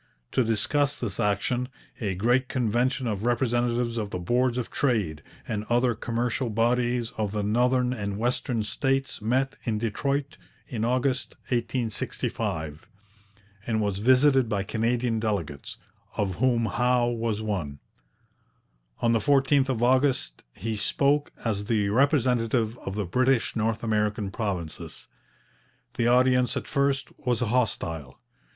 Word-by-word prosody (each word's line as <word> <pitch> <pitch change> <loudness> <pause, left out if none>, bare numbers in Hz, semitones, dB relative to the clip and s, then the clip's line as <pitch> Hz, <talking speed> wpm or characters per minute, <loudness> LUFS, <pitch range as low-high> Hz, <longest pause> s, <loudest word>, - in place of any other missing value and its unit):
To 130 - +2
discuss 135 +6 +1
this 105 -4 -4
action, 115 +4 0 0.3
a 100 -5 -1
great 120 +7 +2
convention 125 +2 0
of 105 -4 -2
representatives 120 -1 +1
of 105 -3 -2
the 90 - -3
Boards 120 +7 +1
of 125 - -3
Trade 105 - 0 0.3
and 105 -1 -2
other 120 +1 +3
commercial 120 +2 -2
bodies 120 +1 +1
of 105 -2 0
the 105 -1 -1
northern 125 +4 +2
and 100 -4 -3
western 120 0 0
States 135 +4 -1
met 130 +5 0
in 110 -2 -1
Detroit 140 +7 -2 0.3
in 115 -6 -3
August 130 +2 0
1865, 110 - -2 0.8
and 110 -2 +1
was 100 -2 -1
visited 130 +1 +4
by 100 -2 0
Canadian 115 +2 0
delegates, 95 -10 -3 0.4
of 100 -3 0
whom 120 -1 +2
Howe 125 +2 +2
was 115 -2 -2
one. 90 -10 -3 1.3
On 115 - +4
the 115 - +3
14th 135 +2 +3
of 120 -3 0
August 130 - +2
he 110 +3 -3
spoke 140 +8 +1
as 105 -3 -1
the 105 -3 +1
representative 120 -3 +2
of 95 - -6
the 105 -2 -1
British 125 +6 +1
North 110 0 -1
American 105 -2 0
provinces. 95 -7 -5 0.9
The 115 - +1
audience 125 0 +3
at - - -4
first 140 -1 0
was 125 -2 -1
hostile. 105 - -1
120 Hz, 130 wpm, -26 LUFS, 105-125 Hz, 1.3 s, visited